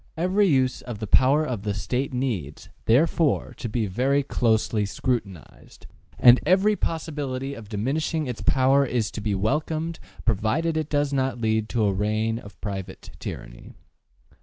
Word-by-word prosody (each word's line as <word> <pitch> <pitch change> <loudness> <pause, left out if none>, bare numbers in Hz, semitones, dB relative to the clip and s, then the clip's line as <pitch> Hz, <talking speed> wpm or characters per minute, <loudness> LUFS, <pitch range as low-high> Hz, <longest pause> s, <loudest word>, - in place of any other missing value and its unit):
Every 185 +4 +2
use 130 -5 +2
of 120 -4 -7
the 110 - -4
power 135 +8 +4
of 120 -8 -3
the 105 -1 -2
State 125 +6 -2
needs, 115 - -3 0.2
therefore, 150 +5 +2
to 120 - -5
be 110 +1 -1
very 135 +8 +1
closely 110 -4 +1
scrutinized, 100 - -4 0.3
and 120 +1 +7
every 195 +5 +3
possibility 140 -6 -3
of 115 -6 -10
diminishing 150 +9 -1
its 125 -4 -5
power 135 +1 +3
is 120 -4 -1
to 110 - -6
be 105 -1 -1
welcomed 155 +10 -1 0.3
provided 115 - +1
it 155 -1 -2
does 145 -1 0
not 130 -3 0
lead 110 -1 0
to 115 -2 0
a 100 - +2
reign 110 +3 0
of 100 -3 -14
private 95 -2 -6
tyranny. - - -8
125 Hz, 155 wpm, -25 LUFS, 110-145 Hz, 0.3 s, and